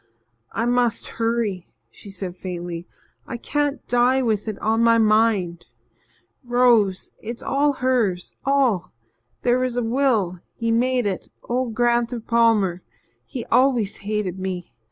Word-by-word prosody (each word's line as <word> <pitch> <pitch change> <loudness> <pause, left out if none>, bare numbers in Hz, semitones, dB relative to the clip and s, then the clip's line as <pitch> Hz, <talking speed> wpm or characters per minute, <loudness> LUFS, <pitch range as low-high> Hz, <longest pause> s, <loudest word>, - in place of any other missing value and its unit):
"I 230 - -1
must 240 -2 +1
hurry," 225 -6 -1 0.2
she 200 - -13
said 190 -2 -6
faintly. 175 -2 -6 0.4
"I 240 - -4
can't 290 +3 -2
die 250 +2 +3
with 220 -3 0
it 215 -2 -3
on 225 +1 +1
my 230 0 +5
mind. 215 - +2 0.8
Rose 240 -6 +3
it's 230 +2 -7
all 285 +1 +2
hers 240 -9 0
all. 265 -9 +1 0.5
There 245 +1 +3
was 255 -1 -1
a 245 - +1
will 225 -7 +1 0.2
he 230 -1 -1
made 250 +1 +2
it 195 -3 -3
old 245 -2 -2
Gran'ther 240 0 +1
Palmer. 225 -6 +2 0.5
He 250 -5 -6
always 245 -4 +3
hated 200 -3 -3
me. 185 -2 -4
230 Hz, 135 wpm, -23 LUFS, 195-245 Hz, 0.8 s, my